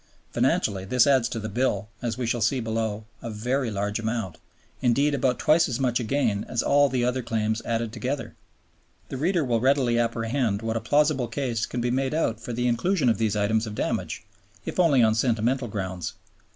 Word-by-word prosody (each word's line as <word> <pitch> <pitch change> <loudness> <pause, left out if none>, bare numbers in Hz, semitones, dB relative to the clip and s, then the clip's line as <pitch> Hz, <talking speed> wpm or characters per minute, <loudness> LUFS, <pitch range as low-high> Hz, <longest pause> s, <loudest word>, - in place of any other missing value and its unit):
Financially 95 -3 +1
this 120 +5 +3
adds 130 -4 +3
to 120 - -4
the 110 - -4
Bill, 110 -2 -1
as 120 -3 -2
we 125 - -2
shall 115 +1 -1
see 125 +5 +2
below, 110 -2 -2 0.2
a 115 - -5
very 120 +4 -1
large 105 +1 -2
amount, 110 -5 -3 0.4
indeed 140 +4 +2
about 130 -2 +1
twice 160 0 +3
as 125 +1 -2
much 125 -2 +1
again 115 -4 0
as 120 - 0
all 145 0 +4
the 125 -2 0
other 125 +1 0
claims 110 -1 -1
added 115 -1 -2
together. 125 +2 -3 0.8
The 135 - -4
reader 170 +4 +1
will 120 -2 +1
readily 130 -2 +2
apprehend 115 -1 0
what 115 0 -2
a 115 - -1
plausible 145 +1 +2
case 115 -1 -2
can 125 - -3
be 120 0 0
made 135 +3 0
out 115 -9 0
for 120 +1 -7
the 120 +1 -1
inclusion 130 +4 +1
of 110 - +1
these 110 -2 +1
items 110 +2 +1
of 105 - -6
damage, - - -2 0.4
if - - -4
only 145 -9 +5
on 110 -1 +4
sentimental 120 +2 +1
grounds. 95 -5 -4
120 Hz, 195 wpm, -25 LUFS, 110-130 Hz, 0.8 s, only